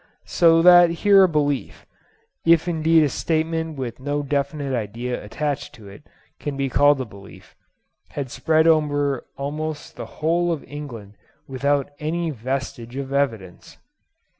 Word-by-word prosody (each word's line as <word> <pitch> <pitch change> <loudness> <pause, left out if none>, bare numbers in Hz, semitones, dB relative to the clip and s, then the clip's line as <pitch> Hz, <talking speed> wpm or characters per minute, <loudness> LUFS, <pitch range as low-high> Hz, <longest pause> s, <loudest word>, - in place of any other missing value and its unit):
So 165 -1 +4
that 175 -1 +8 0.2
here 200 -2 +7
a - - 0
belief—if 155 +2 -2
indeed 160 -1 +3
a 145 - +1
statement 160 +1 -2
with 125 -2 -5
no 145 +2 -2
definite 140 0 -2
idea 120 +2 -4
attached 145 +6 -4
to 105 -4 -13
it 100 - -13 0.4
can 145 -2 -5
be 135 -1 -1
called 145 +2 +4
a - - -3
belief—had 110 +5 -12
spread 160 0 +2
over 145 -4 +1
almost 150 +2 -5
the - - -6
whole 170 +2 +1
of 160 -4 -3
England 120 -8 -9 0.3
without 140 +1 -1
any 165 +2 -2
vestige 130 -1 -5
of 135 0 -5
evidence. 115 -11 -3
145 Hz, 135 wpm, -22 LUFS, 130-160 Hz, 0.4 s, that